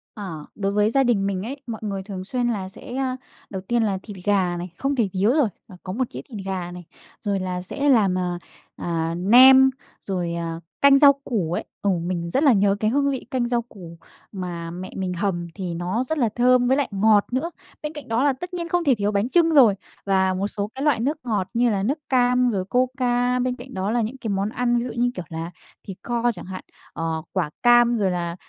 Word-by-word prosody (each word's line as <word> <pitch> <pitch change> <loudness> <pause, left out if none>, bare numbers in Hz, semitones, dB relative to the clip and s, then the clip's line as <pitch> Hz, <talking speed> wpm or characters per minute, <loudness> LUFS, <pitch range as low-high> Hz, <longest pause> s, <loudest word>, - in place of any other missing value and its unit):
Ờ. 170 -8 -7
Đối 200 -1 -1
với 210 +1 +2
gia 270 +3 +3
đình 205 -5 +2
mình 190 -1 -2
ấy, 275 +5 -6
mọi 225 -1 -5
người 195 -2 -3
thường 190 -2 -6
xuyên 245 +4 -1
là 195 -5 -2
sẽ 245 - -9
a, 260 -1 -1 0.3
đầu 190 -2 -5
tiên 235 +4 0
là 200 -3 0
thịt 205 -3 -9
gà 190 -4 +2
này, 175 +1 -5
không 275 +1 -1
thể 220 -6 +1
thiếu 200 +5 +2
rồi, 290 -5 +3 0.2
và 185 -4 -13
có 185 0 -5
một 255 +1 -1
đĩa - - -5
thịt 200 -5 -7
gà 180 -2 -3
này. 175 -1 -9 0.4
Rồi 200 -3 -1
là 180 -1 -3
sẽ 280 +10 -1
làm, 200 -8 +4
à, 175 -1 -2 0.4
à, 165 -1 -2
nem, 260 +7 +7 0.3
rồi, 180 -3 -3
à, 165 -1 -4 0.2
canh 280 0 +7
rau 285 -1 +8
củ 180 -9 -1
ấy, - - -2 0.2
ờ, 200 - +1
mình 170 -1 -2
rất 270 - +1
là 275 -5 +6
nhớ 200 0 +3
cái 215 - +1
hương 280 +1 +2
vị 265 - -4
canh 245 -2 0
rau 240 -1 +1
củ 180 -8 -12 0.3
mà 175 -4 -5
mẹ 185 +2 -7
mình 185 -2 -2
hầm 175 -2 -2
thì 185 -4 -4
nó 180 +8 -1
rất 315 +5 -3
là 240 -6 +2
thơm 250 0 +4
với 265 +2 +3
lại 285 - +1
ngọt 205 +1 +4
nữa. 305 +7 -1 0.3
Bên 300 +1 -4
cạnh 295 - -9
đó 230 +4 +1
là 285 - +3
tất 355 +8 -8
nhiên 340 -1 -4
không 355 -1 +1
thể 275 -6 +4
thiếu 205 0 0
bánh 205 +4 0
chưng 335 0 +4
rồi, 235 -9 +6 0.3
và 190 -1 +2
một 195 +2 -1
số 205 0 -4
cái 270 - -4
loại 295 -6 +3
nước 285 +6 0
ngọt 210 -6 -1
như 240 +1 +3
là 195 -2 0
nước 280 +9 0
cam 250 -1 +3
rồi 190 -4 -1
Coca. 250 +1 +1
Bên 250 0 0
cạnh 255 +1 -11
đó 190 +3 -2
là 240 0 +1
những 230 +5 -3
cái 230 -4 -5
món 200 +1 0
ăn 240 +1 0
ví 235 - 0
dụ 245 - -4
như, 245 +1 +2
kiểu, 180 -2 -5
là 165 +1 -5 0.4
thịt 190 -1 -7
kho 240 0 0
chẳng 180 - -10
hạn, 185 0 -7 0.3
ờ, 165 -1 -2
quả 180 -6 -1
cam 240 -1 +5
rồi 195 -3 +1
là, 170 -1 -3
210 Hz, 240 wpm, -23 LUFS, 185-250 Hz, 0.4 s, rau